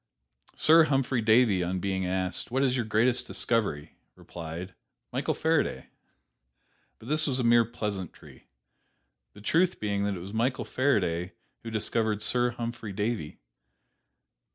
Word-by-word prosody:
Sir 160 +1 +6
Humphry 135 -4 0
Davy 110 -4 +4
on 90 +2 -2
being 95 -1 -2
asked, 95 -1 -1
"What 130 +3 0
is 130 -2 +2
your 120 -3 -1
greatest 115 +4 +2
discovery?" 105 -11 -1 0.2
replied, 85 +2 -8 0.4
"Michael - - -1
Faraday." - - 0 1.1
But 110 - -14
this 155 +2 +2
was 130 -3 -1
a 125 - -1
mere 115 0 +5
pleasantry, 105 -6 -7 0.9
the 105 - -14
truth 175 - +1
being 100 -1 -1
that 100 -1 -1
it - - -6
was 95 +4 -9
Michael 120 +4 0
Faraday 90 -10 0 0.3
who 115 - -7
discovered 110 -1 0
Sir 120 +3 +2
Humphry 115 -3 -5
Davy. 105 -6 -3
110 Hz, 135 wpm, -28 LUFS, 95-125 Hz, 1.1 s, Sir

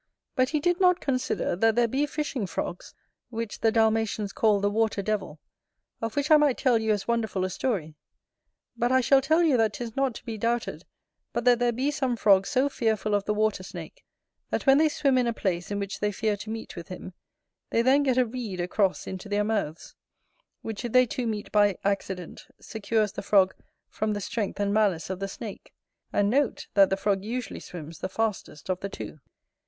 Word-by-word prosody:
But 255 0 +2
he 305 - 0
did 350 +4 +1
not 360 -1 +4
consider, 255 -8 -1
that 225 +4 +3
there 240 0 +3
be 275 +5 0
Fishing 285 -8 -3
frogs, 175 0 -5 0.3
which 230 -2 -5
the 225 - +3
Dalmatians 220 -2 +1
call 215 -2 +3
the 200 - +1
Water 220 -2 0
devil, 195 -7 -2 0.6
of 225 -1 -3
which 285 +2 0
I 310 - +9
might 295 -4 +3
tell 250 -4 +3
you 220 0 0
as 205 -2 -1
wonderful 220 -5 0
a 185 - -3
story: 185 -10 -2 0.8
but 240 +1 0
I 260 - +5
shall 270 +2 +4
tell 315 +5 +3
you 300 -6 +4
that 225 -1 +2
'tis 235 -2 -6
not 270 -3 0
to - - -10
be 225 -3 -5
doubted 235 +2 -1 0.5
but 235 0 -2
that 245 -1 +5
there 245 0 +2
be 260 +5 0
some 265 -5 -1
frogs 195 -3 +4
so 260 +2 +2
fearful 220 -5 0
of 205 -1 +1
the 210 - +1
water 215 -2 +1
snake, - - -9 0.5
that - - -2
when 270 +1 +6
they 310 0 +4
swim 275 -3 +2
in 245 - +1
a 235 - 0
place 180 -5 -2
in 205 - -2
which 200 -1 -4
they 210 0 0
fear 215 +1 0
to 205 +2 -8
meet 225 0 -6
with 170 -2 -8
him 185 0 -8 0.6
they 230 - +2
then 265 +3 +5
get 260 -3 +1
a 255 - +4
reed 225 -6 -5
across 185 +2 0
into 190 +2 -7
their 205 0 +1
mouths; 205 -7 -2 0.7
which 220 +1 -5
if 240 - -4
they 255 0 +6
two 245 0 -3
meet 210 -2 -4
by 205 -3 +3
accident, 195 -3 -3
secures 220 -1 -1
the - - -6
frog 195 -2 +4 0.3
from 215 0 -2
the 205 - -2
strength 205 0 -3
and 200 0 +1
malice 200 -5 +1
of 185 - -4
the 195 - -2
snake; 205 +1 -9 0.4
and 205 - +2
note, 265 +4 +1
that 195 -2 +6
the 190 - 0
frog 195 -1 0
usually 245 +3 -4
swims 165 -2 -9
the 185 - -3
fastest 210 -8 -3
of 185 -1 -1
the 200 - -4
two. - - -8
220 Hz, 210 wpm, -27 LUFS, 200-250 Hz, 0.8 s, I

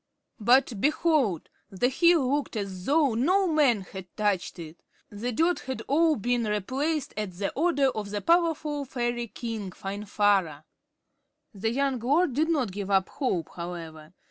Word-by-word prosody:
But, 240 -1 +3
behold! 295 - +1 0.2
The 220 +6 0
hill 335 0 +4
looked 290 -4 -3
as 195 -3 -5
though 290 -3 +3
no 360 - +2
man 290 - +3
had 190 0 -9
touched 200 -4 0
it. 165 -1 -9 0.3
The 220 +4 -4
dirt 330 +9 +1
had 260 0 -5
all 315 +2 +3
been 240 0 0
replaced 260 +9 -2
at 210 -4 -4
the 195 +3 -3
order 285 -3 +2
of 210 -3 -5
the 205 0 -2
powerful 320 - +1
fairy 240 -2 -2
king, 225 -3 -5
Finvarra. 195 -5 0 0.9
The 210 +2 -2
young 270 +1 0
lord 285 +6 +2
did 310 +5 +1
not 270 - +1
give 200 +1 -5
up 195 -1 +2
hope, 185 - -2
however. 170 -2 -8
235 Hz, 150 wpm, -27 LUFS, 195-290 Hz, 0.9 s, hill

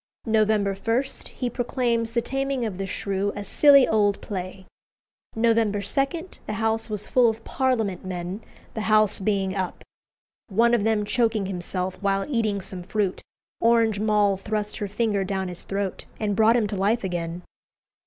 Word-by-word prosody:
November 215 -3 +2
1, 225 +6 0 0.3
he 250 - -2
proclaims 235 -2 -1
the 235 -1 +1
"Taming 270 -2 -1
of 195 -4 -4
the 195 - -2
Shrew" 200 +1 -1
"a 205 - -4
silly 280 +6 +6
old 205 -2 +2
play." 190 -1 -6 0.7
November 225 -2 +2
2, 270 +8 +1 0.4
the - - -2
house 225 +1 -1
was 210 -1 -4
full 245 -2 +4
of 225 0 -5
Parliament 230 -8 0
men, 185 +2 -5 0.3
the 220 0 -3
House 215 -1 +4
being 195 -1 0
up. 185 -2 -3 0.7
One 230 +4 +3
of 235 -4 +3
them 220 -2 +1
choking 220 -1 +1
himself 185 0 -4
while 195 -1 +1
eating 220 -7 0
some 185 -1 -7
fruit, 195 +1 -1 0.4
Orange 230 -3 +3
Moll 210 -2 +2
thrust 210 +1 -3
her 205 - -3
finger 205 -1 0
down 190 -1 -2
his 180 - -8
throat 195 -1 -4
and 205 -2 0
brought 220 +3 +5
him 230 - +2
to 205 - -3
life 205 +5 +1
again. 175 -1 -3
210 Hz, 165 wpm, -25 LUFS, 195-230 Hz, 0.7 s, silly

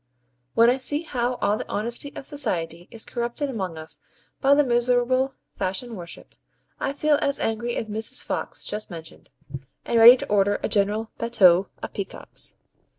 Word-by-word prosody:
when 230 +1 +6
I 250 +2 +4
see 290 +4 +1
how 250 -5 -1
all 210 - +2
the - - -7
honesty 235 +6 -2
of - - -7
society 175 - -2
is 225 - -6
corrupted 240 +4 -3
among 190 -8 -4
us 160 0 -7 0.4
by 280 0 +5
the 295 - +4
miserable 250 +1 +1 0.2
fashion 210 +6 -2
worship, 170 -3 -9 0.5
I 275 - -1
feel 295 +1 +2
as 280 - 0
angry 235 +2 -1
as - - -2
Mrs. 220 +1 +2
Fox - - -4
just 210 +1 -3
mentioned, 165 -2 -10 0.6
and 235 - +2
ready 240 +3 +10
to - - -5
order 205 0 +2
a - - 0
general 210 +2 0
BATTUE 195 -6 +4 0.2
of - - -6
peacocks. 195 -2 -5
230 Hz, 165 wpm, -24 LUFS, 200-255 Hz, 0.6 s, ready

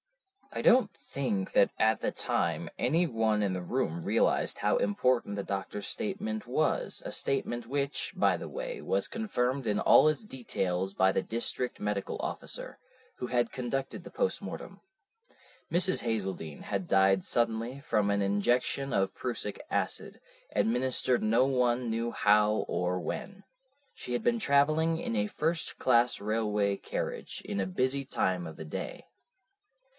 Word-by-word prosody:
"I - - -2
don't 250 +1 +5
think 105 -9 -3
that 100 - +5
at 110 -1 +2
the - - 0
time - - -1
any 170 +3 +2
one 110 -6 +1
in 100 -2 0
the 90 - -3
room 90 -5 -2
realized - - +2
how - - +2
important 105 +1 +1
the 100 - -3
doctor's 100 +1 -4
statement 110 0 -2
was, 145 +6 0
a - - -4
statement 120 -4 -1
which, 140 +2 -2
by - - +3
the - - -6
way, - - -5
was - - 0
confirmed 135 - -1
in 105 -2 +1
all 155 - +6
its 155 +8 -2
details 95 - -2
by 95 0 +4
the - - +1
district 120 +3 -2
medical 105 -1 -2
officer, - - -5 0.4
who 125 - -4
had 120 -2 +1
conducted 135 +2 -3
the - - -9
postmortem. - - -3 0.9
Mrs. 180 +2 +4
Hazeldene 95 -9 -3
had 100 -3 -3
died 95 -1 +4
suddenly 115 +2 0
from 105 -9 +1
an 100 0 +1
injection 120 +7 +1
of 95 -3 +1
prussic 115 -4 -2
acid, - - -1 0.3
administered 125 +1 +1
no 115 +4 +4
one 125 -2 +1
knew 115 +1 -1
how 105 0 +3
or 90 +1 -1
when. 200 - -5 0.5
She 125 - -6
had 120 - -1
been 235 -1 +2
travelling 155 0 +3
in 115 - -3
a 105 -1 +1
first 160 +7 -1
class 120 -1 +3
railway 105 -1 0
carriage - - -5
in 100 - -2
a 95 - -1
busy 130 +8 0
time 90 -9 0
of 80 - -9
the 80 - -7
day. 75 - -6
115 Hz, 150 wpm, -30 LUFS, 100-135 Hz, 0.9 s, all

